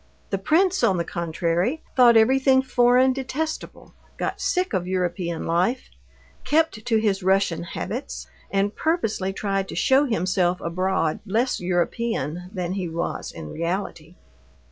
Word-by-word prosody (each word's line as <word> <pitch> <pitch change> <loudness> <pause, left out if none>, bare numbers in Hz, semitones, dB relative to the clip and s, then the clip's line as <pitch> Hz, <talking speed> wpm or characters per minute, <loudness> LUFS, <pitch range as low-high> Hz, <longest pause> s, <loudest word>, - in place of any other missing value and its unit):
The 195 - 0
prince, 365 - +2
on 190 - +3
the 170 - 0
contrary, 170 - -1
thought 240 -3 +7
everything 265 +3 +4
foreign 250 0 +4
detestable, 275 +4 -5 0.2
got - - -3
sick 365 - 0
of 180 -2 -1
European 175 -2 -2
life, 185 +10 0 0.5
kept 295 -6 +1
to 225 -2 +3
his 205 -3 +1
Russian 190 -2 +2
habits, 225 +9 -5 0.2
and 200 +1 0
purposely 225 - -1
tried 195 -1 -2
to - - -6
show 270 +2 +3
himself 180 - 0
abroad 175 -2 -1
less 225 +5 0
European 180 - -2
than 180 -3 -3
he 185 -3 -3
was 170 +1 -4
in 80 -2 -8
reality. 170 -1 -4
195 Hz, 135 wpm, -24 LUFS, 175-255 Hz, 0.5 s, thought